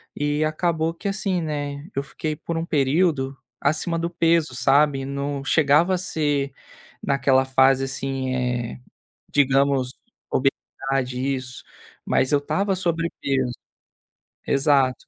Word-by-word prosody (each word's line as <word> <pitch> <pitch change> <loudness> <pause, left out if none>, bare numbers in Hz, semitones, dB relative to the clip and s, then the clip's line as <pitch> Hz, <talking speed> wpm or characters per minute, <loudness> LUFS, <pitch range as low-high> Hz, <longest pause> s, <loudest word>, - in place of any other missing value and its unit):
e 145 +1 0
acabou 160 +1 0
que 185 +4 -6
assim, 195 -3 -1
né, 145 -2 -4
eu 140 - -1
fiquei 155 +2 -4
por 165 +1 -4
um 165 - -2
período 140 -2 +1 0.2
acima 155 +3 0
do 170 +1 -1
peso, 165 -5 +2
sabe, 140 +1 +3
não 140 0 -3
chegava 155 +5 +3
a - - -1
ser 145 -6 0 0.5
naquela 135 -1 +3
fase 130 0 +4
assim, 135 0 -2
eh, 125 - -2 0.5
digamos, 135 -2 +2 1.1
isso, 130 0 -3 0.4
mas 130 - +1
eu 145 - +4
estava 195 +7 0
sobrepeso. 165 -7 -1 0.9
Exato. 135 -2 +2
140 Hz, 115 wpm, -23 LUFS, 135-165 Hz, 1.1 s, fase